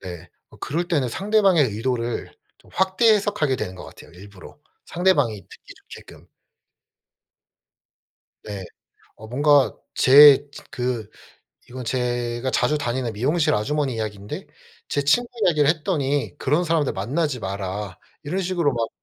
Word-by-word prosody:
네. 90 -2 -9 0.2
어 - - -17
그럴 170 +4 -3
때는 145 -8 0
상대방의 195 - +2
의도를 120 +1 -3 0.3
좀 - - -23
확대 190 +4 +3
해석하게 200 -10 0
되는 95 -5 -5
것 - - -10
같아요, - - -14
일부러. 95 +5 -14 0.3
상대방이 145 - +1
듣기 - - -16 0.2
좋게끔. - - -13 2.2
네. 100 -3 -7 0.5
어 110 - -12
뭔가 145 +2 +3 0.2
제 145 +1 +7
진 - - -12
그 125 -6 -3 0.6
이건 125 0 -8
제가 120 0 -2
자주 150 +3 +1
다니는 125 -4 -2
미용실 150 +8 +1
아주머니 135 +5 -1
이야기인데 105 -2 -6 0.4
제 145 - -1
친구 200 +13 +2 0.2
이야기를 150 -4 +3
했더니 150 -4 -1
"그런 150 +7 +1
사람들 160 -4 0
만나지 135 - -2
마라." 95 0 -5 0.3
이런 180 +7 -2
식으로 175 -6 0
막 115 -2 -2
135 Hz, 290 characters per minute, -22 LUFS, 115-155 Hz, 2.2 s, 제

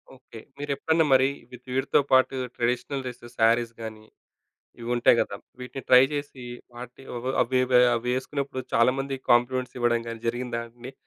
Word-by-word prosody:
Okay. 125 -3 -13 0.2
మీరెప్పుడన్నా 145 +3 0
మరి, 130 0 +5 0.2
వి 125 - -9 0.2
వీటితో 135 +2 +2
పాటు 130 0 +4 0.2
ట్రెడిషనల్ 125 +3 -1
డ్రెసెస్, 120 -1 -9
శారీస్ 115 +1 +3
గాని, 110 -1 -8 0.8
ఇవుంటాయి 120 0 +3
గదా! 100 - -2 0.2
వీటిని 125 +1 -7
ట్రై 125 0 +8
చేసి, 145 -4 -6 0.3
వాటి 125 +2 -10
అవ్ 120 +2 -4
అవి 130 +1 +1 0.4
అవేసుకున్నప్పుడు 130 +3 -3
చాలా 115 +2 +4
మంది 135 0 -3
కాంప్లిమెంట్స్ 125 +1 +2
ఇవ్వడం 120 -1 +2
గాని 115 0 -8
జరిగిందా 120 0 -3
అండి. 120 +3 -11
125 Hz, 140 wpm, -26 LUFS, 120-130 Hz, 0.8 s, ట్రై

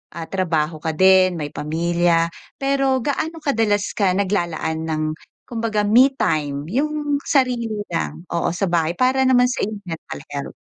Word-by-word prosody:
ah, 170 - -5
trabaho 160 -4 -1
ka 160 0 -3
din, 185 +1 +5
may 150 -3 -4
pamilya, 170 +2 +1 0.2
pero 275 -2 +1
gaano 315 +3 -2
kadalas 220 -7 +1
ka 190 -3 +1
naglalaan 170 -5 -1
ng 155 -1 -1 0.5
kumbaga 225 -3 -1
me-time, 205 - +2
yung 295 +3 0
sarili 250 -4 +2
mo 210 -1 -4
lang? 165 -2 -3
Oo, 170 -1 0
sa 190 +1 -1
bahay 170 -1 +1
para 255 +5 +2
naman 250 -1 +4
sa 255 - -1
iyong 210 0 -6
mental 165 -5 -7
health? 140 -1 -5
190 Hz, 150 wpm, -21 LUFS, 165-250 Hz, 0.5 s, din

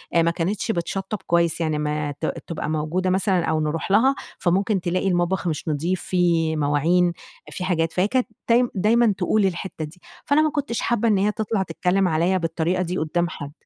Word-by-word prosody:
أ 170 - +6
ما 165 0 +2
كانتش 190 +7 -1
بتشطّب 195 +3 -3
كويس، 170 -1 +2
يعني 155 -2 0
ما 150 0 -1
ت - - 0 0.2
تبقى 165 -2 -4
موجودة 160 +4 -1
مثلًا 185 -2 +1
أو 160 -1 0
نرُوح 155 +4 -2
لها 255 +7 +4 0.2
فممكن 195 +2 +1
تلاقي 180 +2 -1
المطبخ 180 0 0
مش 160 0 -3
نضيف، 165 +4 -1
في 170 -3 +1
مواعين، 160 +4 +2 0.4
في 185 - -5
حاجات، 165 -3 0
فهي 185 +2 +2
كانت 255 +2 0 0.2
تاي 240 +1 +4
دايمًا 220 +3 +3
تقول 200 +3 +2
الحتّه 180 -3 -3
دي، 165 +4 -14 0.2
فأنا 285 +2 +3
ما 310 - +3
كنتش 285 -6 -2
حابة 235 -1 +1
إن 210 -3 +3
هي 200 +2 +2
تطلَع 215 -2 -1
تتكلّم 190 +1 0
عليَّ 175 +3 +1
بالطريقة 165 +2 -1
دي 180 +1 -3
قُدّام 170 +2 0
حد. 145 -5 -7
180 Hz, 190 wpm, -23 LUFS, 165-195 Hz, 0.4 s, أ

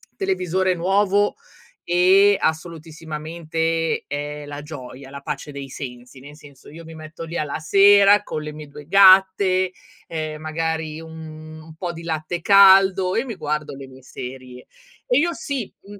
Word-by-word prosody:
televisore 190 - -1
nuovo, 200 +3 +1 0.5
e 190 +3 +5
assolutissimamente 160 0 -3
è 145 +1 -5
la 145 0 -8
gioia, 135 -3 -10
la 140 0 -9
pace 145 +1 -6
dei 140 -1 -8
sensi, 125 0 -9
nel 145 +3 -13
senso 140 -3 -17
io 165 +2 -11
mi 165 0 -12
metto 155 +1 -9
lì 165 +1 -6
alla 150 0 -3
sera 200 +4 +5
con 155 - -5
le 150 0 -7
mie 150 0 -9
2 145 +1 -13
gatte, 185 -1 +5 0.4
ehm, 155 -1 -5
magari 160 0 -3
un 160 -1 -10 0.2
un 160 - -14
po' 170 +1 -5
di 165 - -10
latte 165 +1 -4
caldo 190 -1 +5
e 235 - 0
mi 230 -5 -6
guardo 150 -3 -4
le 135 -1 -10
mie 130 0 -16
serie. 125 0 -10 0.4
E 245 - +2
io 345 +2 +1
sì, 275 -8 -5
mhmm 205 0 -13
160 Hz, 160 wpm, -21 LUFS, 150-190 Hz, 0.5 s, e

